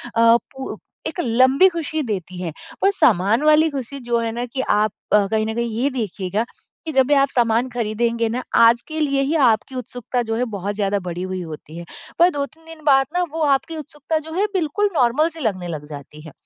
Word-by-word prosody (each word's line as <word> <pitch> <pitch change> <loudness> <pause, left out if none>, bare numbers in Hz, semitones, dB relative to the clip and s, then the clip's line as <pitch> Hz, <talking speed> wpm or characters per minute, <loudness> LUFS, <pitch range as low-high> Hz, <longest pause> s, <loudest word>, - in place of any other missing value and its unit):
अ, 230 +1 +6
पु 265 +2 -8 0.3
एक - - -6
लंबी 260 +8 +4
खुशी 320 -3 -3
देती 185 -6 -4
है। 170 -3 -3 0.3
पर 390 - +4
सामान 215 - +3
वाली 305 +1 +5
खुशी 275 -1 -5
जो 235 -1 +2
है 230 -1 -2
ना 240 +2 -3
कि 260 +2 -4
आप 210 -2 +2 0.2
अ, 210 -1 +5
कहीं 215 0 +1
न 220 - -2
कहीं 235 0 -1
ये 275 - +2
देखिएगा 210 -4 -2 0.4
कि 315 - -3
जब 265 -3 +4
भी 290 - +3
आप 275 -1 +4
सामान 235 0 +1
ख़रीदेंगे 230 0 -1
ना 250 +3 -3
आज 230 +1 +6
के 315 0 -4
लिए 275 -2 +1
ही 300 +4 0
आपकी 225 +4 0
उत्सुकता 250 0 -3
जो 225 - 0
है 245 - 0
बहुत 200 +1 -3
ज़्यादा 200 -1 0
बढ़ी 175 +1 -4
हुई 185 0 -4
होती 160 -1 -9
है। 170 - -7 0.3
पर 345 +1 +7
2-3 300 +2 -5
दिन 325 -1 -12
बाद 270 -2 +5
ना 360 0 +1
वो 325 - -3
आपकी 300 +3 +1
उत्सुकता 300 +1 -3
जो 320 +1 -10
है 390 +4 +1
बिल्कुल 375 +3 +1
नॉर्मल 265 +5 +3
सी 325 0 -11
लगने 195 - -2
लग 155 -3 -5
जाती 150 +1 -10
है। 155 - -11
245 Hz, 220 wpm, -21 LUFS, 215-295 Hz, 0.4 s, पर